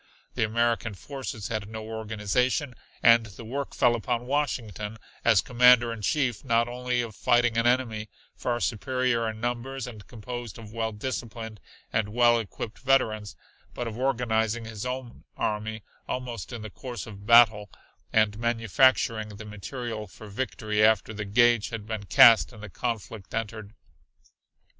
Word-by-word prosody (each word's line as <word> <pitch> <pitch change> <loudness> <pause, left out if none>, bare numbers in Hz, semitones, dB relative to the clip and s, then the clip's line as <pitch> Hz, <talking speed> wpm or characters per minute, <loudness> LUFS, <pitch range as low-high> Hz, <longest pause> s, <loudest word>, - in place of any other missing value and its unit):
The - - -3
American 110 -2 0
forces 130 -3 -6
had 110 -2 -3
no 110 0 -7
organization, 110 +5 -1 0.3
and 115 -1 +6
the 105 +3 -11
work 140 +4 -4
fell 120 -2 +4
upon 120 +1 -2
Washington, 115 -7 -2 0.3
as - - +5
Commander 125 -1 +5
in 115 - -8
Chief, 125 +1 0
not 115 -2 +2
only 125 0 -1
of 110 -3 -8
fighting 120 -2 +2
an 115 +1 +2
enemy 115 -4 0 0.3
far 120 -1 -2
superior 120 +1 0
in 110 0 -7
numbers 120 +2 -3
and 110 -5 -10
composed 120 -1 -7
of 110 -2 -11
well 115 -1 -1
disciplined 110 -1 -5 0.3
and 105 -1 +1
well 120 +1 +4
equipped 110 +1 -6
veterans, 110 -6 +1 0.4
but 120 - -3
of 110 - -5
organizing 115 -3 0
his 110 +1 -5
own 125 -1 -6
army 110 0 -2 0.2
almost 125 -5 -4
in 115 -3 -6
the 110 - -7
course 120 -3 -7
of 100 -1 -11
battle, 110 -3 +6 0.4
and 110 -1 +2
manufacturing 115 -1 +2
the 105 +1 -9
material 110 +1 -6
for 105 +4 -12
victory 105 -1 -1
after 110 0 +3
the 105 0 -4
gage 120 +2 +3
had 115 -3 -6
been 110 -2 -5
cast 130 -5 +7
and 110 -3 -12
the 105 - -8
conflict 110 -3 -4
entered. 110 -1 -5
115 Hz, 150 wpm, -27 LUFS, 110-120 Hz, 0.4 s, cast